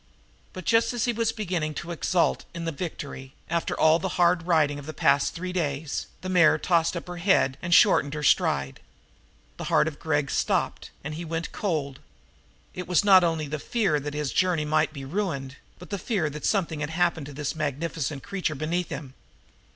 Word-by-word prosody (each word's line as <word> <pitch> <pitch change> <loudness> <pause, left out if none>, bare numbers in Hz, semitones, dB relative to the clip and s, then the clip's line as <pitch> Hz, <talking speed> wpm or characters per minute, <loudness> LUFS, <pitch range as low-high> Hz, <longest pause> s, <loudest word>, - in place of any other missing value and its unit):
But, 185 - -9
just 230 +1 +3
as 240 -2 0
he 240 - +1
was 225 0 0
beginning 175 -9 -2
to 175 - -5
exult 170 +1 +1
in 170 0 -4
the 165 - -1
victory, 140 -4 -7 0.2
after 170 0 -1
all 160 +1 +5
the 190 0 -3
hard 175 -1 +3
riding 150 -4 +2
of 145 - -10
the 155 - -6
past 140 0 +2
three 180 +1 -4
days, 150 -4 -2
the 185 - -6
mare 170 -4 +5
tossed 170 +1 +1
up - - -6
her 175 0 -6
head 170 -7 +3
and 175 - -4
shortened 155 -6 +5
her 150 - -4
stride. 70 - +2 0.8
The - - -5
heart - - +3
of 155 -2 -5
Gregg 145 -3 0
stopped, - - 0
and 150 +2 -5
he 165 +3 -5
went 165 0 -4
cold. 150 -9 -2 0.7
It 180 - -6
was 180 +3 +2
not 190 -3 +7
only 160 -3 0
the 150 +1 -4
fear 195 -6 0
that 145 +1 -5
his 150 -2 -2
journey 180 -5 +2
might 155 +1 +2
be 140 -3 -8
ruined, 140 -5 -3 0.2
but 180 - -13
the 200 - -2
fear 175 -7 -1
that 150 +1 -3
something 170 -7 0
had 145 0 -3
happened 165 -3 0
to 145 - -9
this 145 +1 -3
magnificent 150 -1 -3
creature 185 -6 -2
beneath 165 +4 -2
him. 135 -4 -7
160 Hz, 195 wpm, -26 LUFS, 150-180 Hz, 0.8 s, not